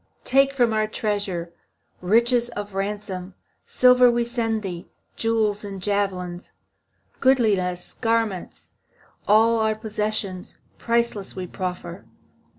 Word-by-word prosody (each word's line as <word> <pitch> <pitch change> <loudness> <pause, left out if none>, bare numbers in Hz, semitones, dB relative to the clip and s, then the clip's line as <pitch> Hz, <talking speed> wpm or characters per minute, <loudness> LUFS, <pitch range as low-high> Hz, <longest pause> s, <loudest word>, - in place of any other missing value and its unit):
Take 275 +1 +3
from 240 -4 +3
our 215 0 +1
treasure 200 -6 -2 0.5
Richest 235 +5 +3
of 205 -1 -5
ransom. 195 -2 -4 0.3
Silver 250 0 +6
we 240 0 +1
send 225 -2 -2
thee, 175 -3 -6 0.3
Jewels 220 -2 0
and 200 -1 -6
javelins, 185 -3 -2 0.7
Goodliest 205 -9 +1
garments, 225 -5 -1 0.6
All 225 +2 +5
our 220 0 +1
possessions, 215 -3 -3 0.2
Priceless, 235 -4 -1
we 185 -1 -4
proffer. 180 - -6
210 Hz, 105 wpm, -23 LUFS, 190-230 Hz, 0.7 s, Silver